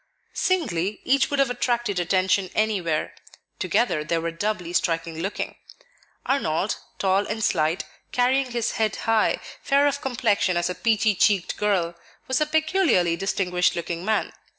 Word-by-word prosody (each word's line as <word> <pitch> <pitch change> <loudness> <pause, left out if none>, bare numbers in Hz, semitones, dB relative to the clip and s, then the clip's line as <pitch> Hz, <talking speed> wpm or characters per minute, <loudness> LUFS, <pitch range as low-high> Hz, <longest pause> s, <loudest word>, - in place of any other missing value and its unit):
Singly, 210 - 0
each 270 +1 +2
would 285 - -1
have 275 -2 +2
attracted 240 -5 0
attention 185 +1 +1
anywhere; 190 -8 0 0.5
together 170 -11 +1
they 165 +2 -1
were 165 0 -2
doubly 180 0 -3
striking 165 -2 -1
looking. 195 +5 -4 0.7
Arnold, 205 - 0 0.2
tall 195 +1 +1
and 220 +1 -3
slight, 160 -1 +1 0.3
carrying 255 +2 +2
his 235 -1 -1
head 220 -2 0
high, 225 -1 +2 0.2
fair 280 +1 +3
of 285 0 0
complexion 220 -8 +1
as 175 +1 0
a - - -2
peachy 220 +1 +2
cheeked 195 -1 +2
girl, 190 -5 0 0.3
was 260 +2 +1
a 305 - +2
peculiarly 315 - +2
distinguished 180 -1 0
looking 170 0 -4
man. 220 +2 0
205 Hz, 145 wpm, -24 LUFS, 175-245 Hz, 0.7 s, fair